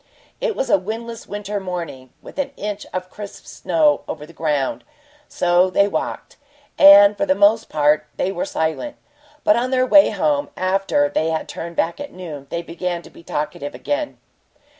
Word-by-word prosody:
It - - -1
was 265 - -2
a - - +5
windless 225 +4 -6
winter 205 0 -4
morning, 170 -9 -6
with - - -10
an 280 0 -2
inch 210 0 -5
of 185 0 -5
crisp 205 -1 -9
snow 155 -4 +1
over 150 -2 -6
the 165 - -16
ground. 150 -4 -1 0.4
So 180 +1 +2
they 200 +2 +3
walked, - - -4 0.4
and 200 +1 +9
for - - -1
the 190 - +3
most 210 +3 +3
part 150 0 +2
they 190 - 0
were 235 - -3
silent, 285 - -2 0.5
but 210 - +5
on 245 +2 0
their 255 -1 +2
way 295 +3 +6
home, 150 -8 0
after 195 +10 +1
they 165 - 0
had 160 -1 -2
turned 170 0 -7
back 165 +8 0
at 285 0 -6
noon, 155 -7 -8
they 170 0 -3
began 175 +1 -4
to - - -14
be - - -15
talkative 150 -3 -4
again. 295 +1 -3
185 Hz, 180 wpm, -21 LUFS, 160-220 Hz, 0.5 s, and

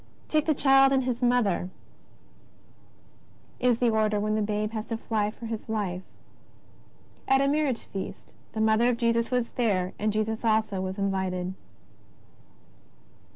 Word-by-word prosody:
'' - - -30
Take 310 0 +1
the 310 - +3
Child 270 -1 +5
and 265 -1 +2
His 250 -1 -2
Mother," 240 -7 +2 1.9
is 245 -2 +3
the 240 -1 +2
order 215 -1 +1
when 215 +1 0
the 215 - +1
Babe 210 0 -1
has 220 0 -5
to 225 - -3
fly 215 -2 -1
for 230 +2 -10
His 225 -1 -5
life. 195 -5 -2 1.3
At 270 0 +4
a 275 - +2
marriage 285 -4 0
feast 195 -1 -7 0.2
^^ - - -32
the 220 - -2
Mother 220 +2 +4
of 240 - 0
Jesus 230 -1 +1
was 250 -2 -1
there, 190 -7 0
and 215 +1 +1
Jesus 215 +2 -2
also 220 -3 +1
was 190 +1 -4
invited." 190 -2 -1
220 Hz, 155 wpm, -27 LUFS, 205-245 Hz, 1.9 s, Child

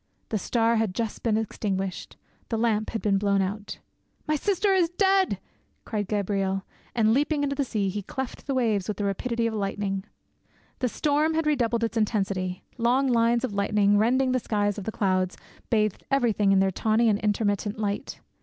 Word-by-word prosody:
The 215 - -1
star 230 +3 +2
had 220 -4 0
just 225 -2 -3
been 220 -2 +1
extinguished; 195 -4 -3 0.3
the 225 - -1
lamp 220 -2 +1
had 225 - -4
been 195 -2 +2
blown 200 -1 +2
out. 200 +2 -3 0.5
"My 305 - +2
sister 395 +5 +1
is 355 -3 +3
dead!" 385 +1 +2 0.5
cried 205 -3 -2
Gabriel 195 -2 -1 0.3
and, 220 -2 +4
leaping 290 +2 +1
into 280 0 0
the 280 - +1
sea, 215 -6 -1
he 205 +2 -3
cleft 265 +7 -6
the 275 - 0
waves 220 -7 +1
with 210 -2 -3
the 205 - -1
rapidity 230 +4 -1
of 230 - 0
lightning. 195 -1 -2 0.8
The 255 - 0
storm 305 +4 +1
had 320 0 +1
redoubled 235 -6 +1
its 230 0 -1
intensity; 195 -4 -1 0.2
long 255 +4 +3
lines 235 0 +3
of 250 -5 -2
lightning, 200 0 +2
rending 255 +4 +3
the 255 - +2
sides 205 -2 -1
of 195 - -8
the 220 - -2
clouds, 185 -3 0 0.3
bathed 215 -3 +1
everything 230 -7 +2
in 195 - +5
their 190 0 +3
tawny 220 +4 +2
and 205 -2 +3
intermittent 205 0 0
light. 210 +5 -3
220 Hz, 180 wpm, -26 LUFS, 200-250 Hz, 0.8 s, in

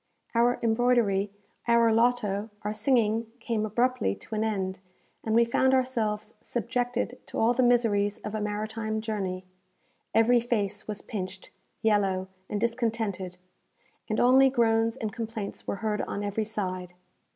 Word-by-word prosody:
Our 240 +1 +3
embroidery, 225 -4 +2 0.4
our 235 -1 +5
loto, 225 -3 +1
our 210 +1 -1
singing 225 -1 +2
came 230 -2 -1
abruptly 240 - +1
to - - -10
an 215 0 0
end, 190 -4 -2 0.4
and 220 0 0
we 235 0 +6
found 260 +3 +3
ourselves 225 -5 -1
subjected 245 +1 -2
to - - -6
all 230 +2 +4
the 255 - +1
miseries 225 -5 +3
of 210 - -7
a 215 - -2
maritime 215 +1 -2
journey. 190 -4 -3 0.7
Every 240 +2 +5
face 210 -4 -2
was 210 -1 -5
pinched, 190 -2 -6 0.3
yellow, 195 -3 +2 0.2
and 210 - -1
discontented, 225 -6 -1 0.7
and 215 - 0
only 265 +2 +6
groans 230 -2 +2
and 215 -3 -3
complaints 225 -3 -5
were - - -1
heard 210 -1 0
on 205 - -3
every 205 +2 -1
side. 185 -4 -4
220 Hz, 140 wpm, -28 LUFS, 205-235 Hz, 0.7 s, we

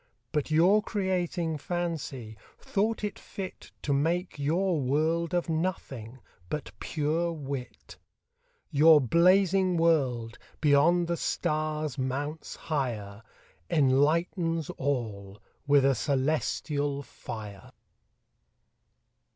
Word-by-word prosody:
But 150 -1 -1
your 175 +7 +5
Creating 180 -6 -1
Fancy, 145 -9 -4 0.2
thought 215 +2 -1
it 205 -2 -3
fit 190 -2 -8
To 145 - 0
make 165 +4 0
your 170 +4 +1
World 160 +6 0
of 175 - 0
Nothing, 140 -8 -3 0.3
but 150 -7 -4
pure 160 +3 -1
Wit. 140 -5 -7 0.7
Your 155 +1 +7
Blazing 180 - +4
World, 130 -9 +1 0.2
beyond 160 +4 +4
the 170 0 -1
Stars 155 -3 -1
mounts 145 +4 -3
higher, 115 -9 -3 0.5
Enlightens 165 +3 +2
all 105 -8 -3 0.3
with 140 -1 +5
a - - +5
Cœlestial 140 +1 0
Fier. 110 -2 -7
William 100 -2 -11
Newcastle. - - -17
155 Hz, 100 wpm, -28 LUFS, 135-170 Hz, 0.7 s, Your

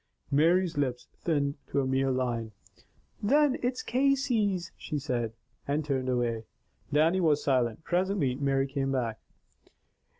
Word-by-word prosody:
Mary's 165 +3 +3
lips 125 -3 -1
thinned 145 -4 0
to - - 0
a 135 - +1
mere 135 +1 +1
line. 120 -4 -1 0.7
"Then 285 +5 +3
it's 250 +1 -1
Casey's," 245 -8 +1
she 150 - -4
said, 125 -5 -2 0.4
and 145 +2 0
turned 130 -3 -1
away. 120 -3 0 0.5
Dannie 160 +5 +3
was 150 -3 +3
silent. 125 0 +1
Presently 180 -6 +1
Mary 135 0 +1
came 135 0 -2
back. 120 -5 -1
140 Hz, 130 wpm, -29 LUFS, 130-180 Hz, 0.7 s, Mary's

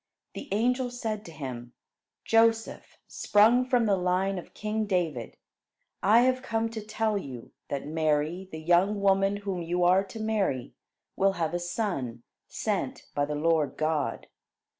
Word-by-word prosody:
The 280 - -7
angel 250 +5 +1
said 220 -4 -4
to 165 - -9
him: 125 -5 -7 0.5
"Joseph, 225 0 +2
sprung 225 +5 +4
from 250 -2 +2
the 205 -2 +3
line 185 +1 0
of - - -14
king 215 0 -2
David, 165 - -2 0.6
I 220 +4 +6
have 255 +1 +2
come 225 -3 -1
to 225 -1 -6
tell 215 0 -1
you, 130 -8 -9 0.2
that 140 -1 -4
Mary, 155 +4 0
the 160 - -6
young 180 +5 +3
woman 195 0 +3
whom 190 -3 -2
you 175 +1 -1
are 185 +2 +5
to 225 - -9
marry, 205 - -1 0.4
will 195 0 +3
have 165 -3 -2
a 175 - 0
son, 175 - -3 0.2
sent - - -3
by 145 - +1
the 150 +1 -3
Lord 155 -2 +1
God. 155 -2 -1
190 Hz, 155 wpm, -28 LUFS, 155-220 Hz, 0.6 s, I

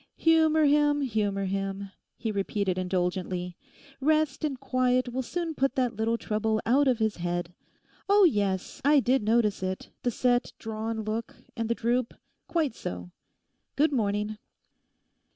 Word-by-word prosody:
'Humour 315 -1 +4
him, 290 0 +3
humour 205 -6 0
him,' 195 0 -3 0.3
he 225 - -2
repeated 200 -1 -1
indulgently. 180 -1 -2 0.4
'Rest 305 0 +1
and 280 -4 -2
quiet 255 -1 +1
will 260 - -1
soon 330 +6 -3
put 275 -2 0
that 250 -3 0
little 225 +2 0
trouble 215 0 -1
out 275 +4 +4
of 255 -3 +3
his 220 -1 0
head. 175 0 -3 0.6
Oh 405 0 +6
yes, 200 - +1
I 290 +1 +5
did 260 +1 +2
notice 215 -1 +2
it—the 190 +6 -4
set 245 +1 +1
drawn 220 0 -4
look, 220 +2 -4 0.2
and 230 -2 -2
the 235 - +1
droop: 240 +1 0 0.3
quite 315 -7 0
so. 90 - -6 0.6
Good 300 +2 +3
morning. 210 -3 -1
230 Hz, 140 wpm, -28 LUFS, 200-270 Hz, 0.6 s, Oh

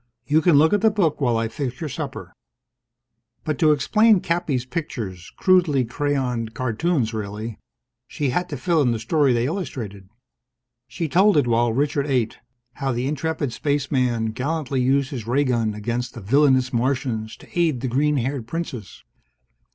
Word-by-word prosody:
"You 150 +2 +3
can 170 -1 +4
look 155 +5 +5
at 205 - +2
the 220 - +5
book 185 -9 0
while 120 -4 +2
I 115 0 0
fix 125 +2 -5
your 160 - -3
supper." 140 - -6 1.1
But 155 - -2
to 155 -2 +5
explain 215 +8 +4
Cappy's 170 -8 -1
pictures 110 - -5
crudely 170 -9 +3
crayoned 125 -3 -2
cartoons, 130 0 0
really 105 +1 -5 0.5
she 140 -4 -2
had 180 +6 -1
to 145 - -4
fill 165 +4 +1
in 125 -4 +2
the - - -1
story 135 +5 +2
they 120 0 +1
illustrated. 115 - -5 0.8
She 145 +7 -3
told 190 +5 +4
it 145 - +4
while 120 0 +2
Richard 140 +3 0
ate: 125 -5 0 0.3
how 135 +1 -2
the 120 +1 -2
intrepid 150 -1 -2
Spaceman 130 -5 0
gallantly 140 +1 -2
used 135 +3 +1
his 120 -6 -6
ray 135 +4 +2
gun 115 -5 0
against 120 +3 -3
the - - -6
villainous 130 +3 +3
Martians 120 -3 -1
to - - -16
aid 155 -8 +1
the 130 - -2
green 145 +4 +1
haired 130 -1 -2
Princess. 125 - -6
130 Hz, 165 wpm, -23 LUFS, 115-150 Hz, 1.1 s, look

